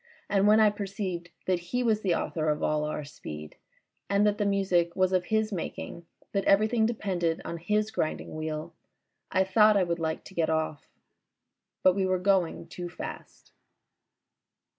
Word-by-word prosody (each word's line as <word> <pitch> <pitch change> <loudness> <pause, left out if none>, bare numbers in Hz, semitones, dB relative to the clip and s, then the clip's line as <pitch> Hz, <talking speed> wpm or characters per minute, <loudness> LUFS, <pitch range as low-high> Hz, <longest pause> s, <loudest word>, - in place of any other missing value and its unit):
And 200 0 +4
when 215 +1 +6
I 215 -1 +6
perceived 195 -4 -4 0.2
that 185 -1 +1
he 245 +9 -2
was 220 -3 +2
the 185 -5 +2
author 155 -2 -1
of 150 0 0
all 150 0 +1
our 150 0 -3
speed 75 - -9 0.5
and 200 +1 +3
that 210 0 +2
the 205 - +2
music 185 -4 +1
was 185 0 +2
of 180 -1 +2
his 220 -1 0
making, 170 -1 -5 0.2
that 200 -1 0
everything 220 +3 +4
depended 185 -8 -1
on 170 - -4
his 210 +5 0
grinding 155 - -2
wheel, 155 +1 -4 0.6
I 190 - +3
thought 210 +2 +5
I 195 - +4
would 170 -1 -1
like 160 -1 -2
to - - -13
get 165 -3 +1
off. 160 -2 -1 1.0
But 185 - +6
we 190 0 0
were 185 0 +2
going 185 -2 +1
too 175 -1 -7
fast. 175 - -9
185 Hz, 170 wpm, -28 LUFS, 170-205 Hz, 1.0 s, when